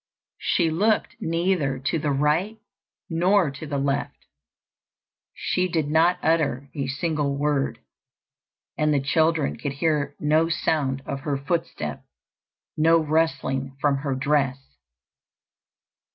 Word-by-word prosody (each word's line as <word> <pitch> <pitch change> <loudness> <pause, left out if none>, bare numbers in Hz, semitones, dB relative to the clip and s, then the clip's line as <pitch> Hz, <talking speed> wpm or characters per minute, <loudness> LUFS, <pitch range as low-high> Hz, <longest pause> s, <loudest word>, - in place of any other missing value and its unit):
She 165 -3 +1
looked 210 +9 +1
neither 165 -6 0
to 140 +5 -1
the 150 - -1
right 150 +10 +1 0.5
nor 175 0 +2
to 145 +3 -8
the 145 -1 -2
left. 140 0 -2 1.1
She 185 0 0
did 160 -4 -1
not 165 +3 +4
utter 150 -4 +1
a 140 -3 -3
single 145 0 -1
word; 145 -1 0 1.0
and 150 0 +3
the 145 - +3
children 155 +2 +1
could 145 -2 -4
hear 145 -1 0
no 155 +2 +2
sound 140 -5 0
of 140 - -4
her 140 0 -2
footstep, 140 - -3 0.7
no 165 +2 +5
rustling 145 -4 0
from 140 0 +2
her 135 -1 -2
dress. 135 - -1
150 Hz, 120 wpm, -24 LUFS, 140-165 Hz, 1.1 s, no